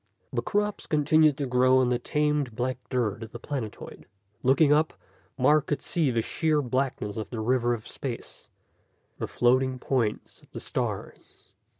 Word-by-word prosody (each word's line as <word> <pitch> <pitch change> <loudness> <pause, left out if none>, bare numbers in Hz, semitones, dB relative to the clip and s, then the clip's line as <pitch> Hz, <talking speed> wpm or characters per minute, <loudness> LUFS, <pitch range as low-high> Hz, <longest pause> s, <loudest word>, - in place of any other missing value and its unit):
The - - 0
crops 210 0 -1
continued 155 -1 +4
to 145 - -1
grow 130 0 +4
on 130 -1 +3
the 125 -1 +1
tamed 150 -2 0
black 125 +2 -2
dirt 115 -4 -1
of 110 -1 -8
the - - -5
planetoid. 120 -4 -6 0.3
Looking 140 +3 +4
up, 155 +1 +2 0.4
Mark 150 +3 +4
could 145 -2 -2
see 160 -5 +1
the 115 -2 0
sheer 155 +3 +1
blackness 130 -5 -2
of 110 - -4
the 120 - -5
river 120 +1 +1
of 110 - -11
space, - - -7 0.7
the - - -2
floating 130 +1 +2
points 125 -4 -2
of - - -23
the - - -5
stars. - - -5
130 Hz, 165 wpm, -27 LUFS, 120-150 Hz, 0.7 s, continued